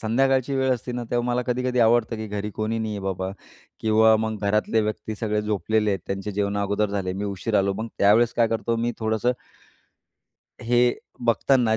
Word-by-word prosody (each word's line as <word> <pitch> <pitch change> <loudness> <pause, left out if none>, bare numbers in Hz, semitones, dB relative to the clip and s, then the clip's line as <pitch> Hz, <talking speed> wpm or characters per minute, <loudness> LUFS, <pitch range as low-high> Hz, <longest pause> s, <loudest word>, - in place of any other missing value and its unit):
संध्याकाळची 130 +4 +1
वेळ 130 0 +1
असते 125 +1 -6
ना, 120 0 -4
तेव्हा 120 0 0
मला 125 +1 0
कधी-कधी 125 0 -1
आवडतं 115 0 +3
की 110 0 -5
घरी 105 0 -4
कोणी 110 +1 -2
नाही 110 -1 -2
आहे 105 - -4
बाबा 95 -1 -2 0.5
किंवा 110 0 +5
मग 110 0 -2
घरातले 105 +2 +2
व्यक्ती 110 0 -3
सगळे 105 0 -1
झोपलेले 105 +1 0
आहेत, 95 - 0
त्यांचे 95 +1 -3
जेवणं 100 0 -1
अगोदर 100 +1 0
झाले, 95 -2 -2
मी 100 +2 -4
उशिरा 100 +2 -1
आलो, 100 0 +1
मग 110 +3 -4
त्यावेळेस 110 +4 +4
काय 115 -1 +3
करतो 115 +1 -1
मी 120 +1 -1
थोडंसं 110 +2 +1 1.3
हे 120 +1 +3 0.3
बघताना 120 0 +3
110 Hz, 185 wpm, -24 LUFS, 105-120 Hz, 1.3 s, किंवा